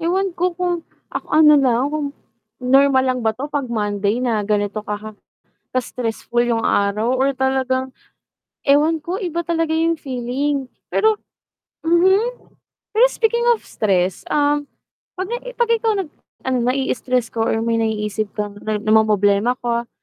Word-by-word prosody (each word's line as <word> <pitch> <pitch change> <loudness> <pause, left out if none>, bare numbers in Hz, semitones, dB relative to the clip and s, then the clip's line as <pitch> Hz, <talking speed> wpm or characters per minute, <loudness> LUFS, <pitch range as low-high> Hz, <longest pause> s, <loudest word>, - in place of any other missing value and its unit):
ewan 370 +3 0
ko 360 +1 -1
kung 355 -2 -1 0.3
ak - - -3
ano 305 -1 +6
lang, 250 -3 +2
kung 300 -2 -1 0.6
normal 270 +1 +4
lang 255 -1 0
ba 220 -1 0
'to 285 +3 -5
'pag 280 -4 -2
Monday 210 0 -1
na 230 -4 +1
ganito 210 0 0
ka 210 +1 -6 0.6
ka-stressful 240 -1 -1
yung 230 -2 0
araw, 210 +5 +1
or 270 +2 +2
talagang 260 0 0 0.7
ewan 295 +4 +4
ko 355 +5 -3
iba 340 -2 -2
talaga 330 -1 0
yung 330 +1 +2
feeling 265 +2 -2 0.2
pero 440 0 +3 0.7
mhm. 380 +9 +2 0.5
Pero 485 +3 +7
speaking 470 +1 +1
of 455 - -1
stress, 185 -3 0
um, 290 0 +2 0.5
'pag 375 +1 -3
i - - -9
'pag 475 -1 +1
ikaw 450 -1 +1
nag 385 -5 -2 0.4
'pag 260 - 0
na-i-istress 255 -2 -1
ka 230 - -3
or 225 0 +1
may 230 0 +1
naiisip 215 -1 -1
kang 205 -1 -3
na 215 -1 -2
namomroblema 215 +1 +3
ka, 235 0 -2
260 Hz, 145 wpm, -20 LUFS, 220-325 Hz, 0.7 s, Pero